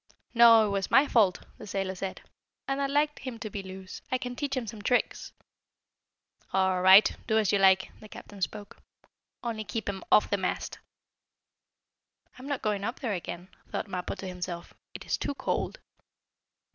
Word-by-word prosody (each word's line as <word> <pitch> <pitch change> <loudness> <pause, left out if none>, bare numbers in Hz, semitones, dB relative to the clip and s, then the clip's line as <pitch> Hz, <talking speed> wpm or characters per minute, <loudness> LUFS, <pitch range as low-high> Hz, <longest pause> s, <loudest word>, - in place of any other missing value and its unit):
"No, 230 -2 +8
it - - -1
was 195 -1 -1
my 270 - +6
fault," 205 -8 +3 0.2
the - - -9
sailor 195 -1 -2
said. 190 0 -5 0.5
"And 270 +1 -1
I'd 275 - 0
like 295 +1 +1
him 255 -3 -6
to 215 -2 -6
be 200 - -4
loose. 190 0 -9
I 255 - +2
can 245 0 -6
teach 280 -1 -2
him 250 - -2
some 220 -1 -8
tricks." 245 +4 0 1.2
"All 190 -1 +2
right, 190 +3 +7
do 220 - +2
as 215 -3 +2
you 200 - +2
like," 190 -1 +4
the 215 - -13
captain 200 -1 -11
spoke. 205 +2 -4 0.7
"Only 225 -2 -3
keep 215 +1 -5
him 195 -2 -4
off - - +5
the 200 - +2
mast." 185 -2 -3 1.6
"I'm 260 - -9
not 285 -2 -3
going 210 -2 -1
up 235 +4 -3
there 235 -6 -1
again," 180 0 -6 0.2
thought - - -3
Mappo 180 -2 -4
to 190 - -7
himself. 180 -1 -6 0.2
"It - - -8
is - - -1
too 285 - -3
cold." - - -2
205 Hz, 180 wpm, -28 LUFS, 190-235 Hz, 1.6 s, No